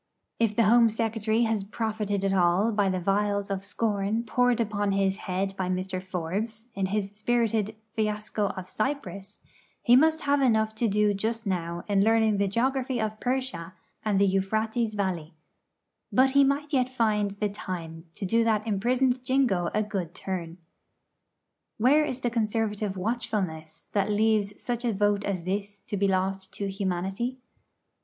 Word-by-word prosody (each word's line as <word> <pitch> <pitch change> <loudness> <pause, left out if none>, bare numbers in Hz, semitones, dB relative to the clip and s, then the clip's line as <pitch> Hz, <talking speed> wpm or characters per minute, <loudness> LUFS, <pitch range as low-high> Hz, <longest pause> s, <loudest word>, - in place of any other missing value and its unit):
If 225 -2 +2
the 230 - +4
Home 230 +1 +6
Secretary 225 0 0
has 220 -3 0
profited 210 -1 -2
at 195 - +1
all 185 +4 +3
by 205 -2 +2
the 185 -1 0
vials 200 +2 0
of 195 -1 -2
scorn 210 +1 -1
poured 245 +1 +2
upon 205 -3 0
his 195 0 +1
head 195 +1 -1
by 185 -1 -2
Mr. 185 0 -2
Forbes, 190 +5 -4
in 195 -1 -1
his 200 0 -2
spirited 220 -1 0 0.2
'Fiasco 210 -1 -1
of 185 -1 -6
Cyprus,' 205 -6 -4 0.4
he 245 - +6
must 315 +4 +4
have 285 -2 +2
enough 220 -4 +2
to 225 +2 0
do 210 0 +2
just 225 +3 -2
now 170 -3 -2
in 200 -1 +3
learning 220 -1 +3
the 200 0 +2
geography 255 +4 0
of 215 -1 -2
Persia 245 -9 -2 0.3
and 205 -3 +1
the 200 - +5
Euphrates 215 +4 0
Valley; 175 -6 -2 0.8
but 265 +1 +4
he 280 +1 +6
might 285 +2 0
yet 255 -2 +2
find 215 -5 +1
the 210 - +1
time 170 -5 -6
to 200 - -3
do 230 +5 +3
that 220 -1 +1
imprisoned 245 +4 +1
Jingo 245 -10 +2
a 215 - +2
good 190 -5 -4
turn. 175 -3 -5 1.2
Where 275 +7 +4
is 260 -3 -4
the 240 - 0
Conservative 215 -3 -1
watchfulness 185 -7 -3
that 200 0 +1
leaves 210 -1 +1
such 240 -1 -3
a 235 -2 +1
vote 205 0 +1
as 185 -4 -2
this 200 +2 -3
to - - -5
be 200 0 +2
lost 190 0 -1
to 200 -1 -3
humanity? 195 +6 -2
210 Hz, 165 wpm, -27 LUFS, 195-230 Hz, 1.2 s, Home